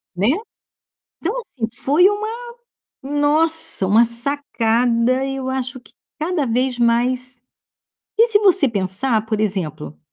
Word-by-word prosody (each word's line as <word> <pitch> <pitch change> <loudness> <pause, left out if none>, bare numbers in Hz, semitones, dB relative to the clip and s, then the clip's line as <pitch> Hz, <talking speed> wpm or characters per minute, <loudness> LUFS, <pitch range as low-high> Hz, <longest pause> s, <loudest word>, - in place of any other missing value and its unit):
Né. 200 +6 +1 0.9
Então, 370 +6 -1
assim, 255 - -5
foi 305 +8 +4
uma 415 +1 -2 0.8
nossa, 290 -3 +1
uma 215 +4 +5
sacada 240 -1 0
e 270 0 -3
eu 260 -1 -4
acho 260 0 -3
que 245 - -22 0.3
cada 315 -1 -1
vez 250 +2 0
mais 250 +2 0 0.8
e 460 +2 +5
se 430 -3 +4
você 385 -8 +4
pensar, 215 +3 -1
por 215 -1 -1
exemplo, 160 -8 -3
255 Hz, 125 wpm, -20 LUFS, 230-290 Hz, 0.9 s, uma